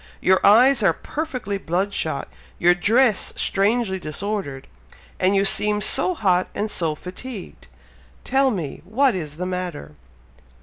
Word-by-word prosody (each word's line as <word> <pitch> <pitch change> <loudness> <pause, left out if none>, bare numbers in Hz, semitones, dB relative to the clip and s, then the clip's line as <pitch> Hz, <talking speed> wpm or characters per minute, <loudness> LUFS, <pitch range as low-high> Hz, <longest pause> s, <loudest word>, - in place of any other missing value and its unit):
Your 190 0 +2
eyes 245 +5 +6
are 190 -5 +3
perfectly 255 - -5
blood 190 +4 -2
shot 155 -7 -3 0.3
your 175 +1 +4
dress 215 +4 +2
strangely 200 -1 0
disordered 165 -4 -4 0.5
and 190 +2 +2
you 195 0 +2
seem 210 +1 +2
so 270 +11 +2
hot 185 - +1
and 210 +1 -2
so 160 -3 -2
fatigued! 190 +6 -9 0.6
Tell 270 0 +2
me! 175 - -4
what 245 +8 +2
is 155 -5 -5
the 180 - -3
matter?" 180 - -5
195 Hz, 135 wpm, -22 LUFS, 180-225 Hz, 0.6 s, eyes